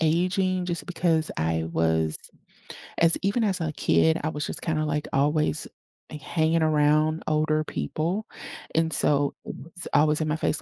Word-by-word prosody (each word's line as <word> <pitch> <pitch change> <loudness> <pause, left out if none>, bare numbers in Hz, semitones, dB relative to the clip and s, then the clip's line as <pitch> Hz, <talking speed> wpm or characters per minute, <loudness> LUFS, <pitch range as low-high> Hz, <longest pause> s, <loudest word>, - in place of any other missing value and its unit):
aging 180 +3 +1
just 170 -1 -3
because 165 -3 0
I 80 0 0
was 80 -1 +1 0.8
as 165 0 +5
even 205 +4 +1
as 195 -3 0
a 160 -1 -1
kid, 160 +2 +2
I 155 - 0
was 150 -1 -3
just - - -5
kinda, 155 -2 -1
like, 150 0 -2
always, 150 +2 +1 0.4
like, 150 - -8
hanging 160 +2 +1
around 155 +1 +2
older 155 0 +1
people, 165 - -3 0.5
and 160 0 +2
so 145 -1 +2
it - - -6
was 165 +5 -8
always 150 +1 +3
in 155 - 0
my 150 - 0
face, 160 - -1
155 Hz, 165 wpm, -25 LUFS, 150-165 Hz, 0.8 s, as